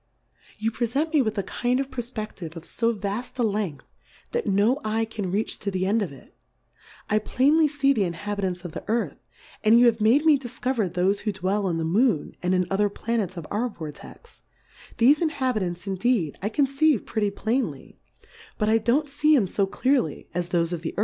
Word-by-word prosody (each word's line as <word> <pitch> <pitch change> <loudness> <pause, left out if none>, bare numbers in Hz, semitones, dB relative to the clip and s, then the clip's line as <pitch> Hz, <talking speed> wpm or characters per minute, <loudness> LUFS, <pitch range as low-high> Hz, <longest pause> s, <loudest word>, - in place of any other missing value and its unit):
You 220 +2 -1
prefent 270 +8 -1
me 300 - +5
with 220 -4 -1
a 200 - 0
kind 250 +5 -1
of 275 0 -3
Per 245 - -3
fpe9:ive 215 -8 -7
of 165 - -8
fo 230 0 0
vafl: 210 +6 -4
a 245 - +1
Length, 205 -8 -2 0.5
that 475 -1 -2
no 215 +9 +2
Eye 220 +1 0
can 215 -4 -4
reach 210 +4 -1
to 200 - -3
the 185 -1 -1
End 215 +4 +2
of 190 - -2
it: 135 - -16 0.7
I 215 - +2
plain 270 +8 +2
ly 315 - +5
fee 275 -1 +2
the 210 -6 +1
Inhabitants 185 0 -3
of 175 - -5
the - - -7
Earth, 230 +2 -1 0.4
and 225 +2 +6
you 245 - +6
have 225 -2 +3
made 245 +8 +4
me 300 -3 +6
difcover 245 -4 -2
thofe 185 +3 +1
who 210 - -2
dwell 195 +1 -1
in 165 - -1
the 165 - -1
Moon, 190 - +1
and 180 +1 +1
in 180 0 +2
other 205 +1 +2
Pla 230 +3 -2
nets 190 -4 -2
of 165 - -6
our 230 +5 0
Vortex; 150 - -11 0.6
thefe 275 +7 +5
Inhabitants 250 - -1
indeed 195 - 0
I 205 - -1
conceive 275 0 +2
pretty 215 -3 0
plainly, 225 +6 -3 0.6
but 210 -1 +1
I 225 +1 +4
don't 250 +7 +1
fee 300 +2 +3
'em 220 - +2
fo 195 +1 0
clearly 250 - 0
as 175 0 -2
thofe 170 -1 +1
of 170 - -3
the 165 - -5
Earth - - 0
215 Hz, 205 wpm, -25 LUFS, 190-250 Hz, 0.7 s, and